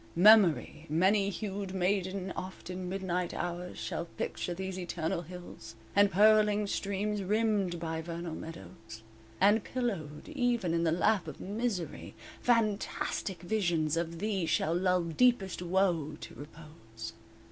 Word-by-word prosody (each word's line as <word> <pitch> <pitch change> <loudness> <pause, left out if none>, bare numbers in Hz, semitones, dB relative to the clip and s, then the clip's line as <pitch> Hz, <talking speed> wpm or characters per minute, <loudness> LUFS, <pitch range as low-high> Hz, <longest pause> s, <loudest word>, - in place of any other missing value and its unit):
Memory, 180 -5 +5
many 195 +6 +3
hued 195 -1 -4
maiden, 190 0 0
Oft 185 0 -7
in 180 0 -5
midnight 180 -2 -2
hours 175 +1 -4
Shall 170 - -3
picture 175 +1 -4
these 190 0 -4
eternal 170 -2 -2
hills, 175 -10 -10 0.2
And 200 0 +6
purling 210 +1 +5
streams, 200 +1 -2
rimmed 205 -3 +1
by 160 -1 -3
Vernal 170 0 -5
meadows; 110 - -9 0.4
And 205 +3 +5
pillowed 195 - -3
even 245 - 0
in 170 0 +1
the 160 - +3
lap 180 +2 +2
of 150 - -7
misery 205 -3 -3 0.3
Fantastic 210 -5 0
visions 175 -6 +1
of 165 0 -2
thee 195 -3 -1
Shall 160 0 +1
lull 180 0 +2
deepest 195 +2 +2
woe 170 -4 +1
to - - -8
repose. 115 -8 -10
180 Hz, 130 wpm, -31 LUFS, 165-205 Hz, 0.4 s, And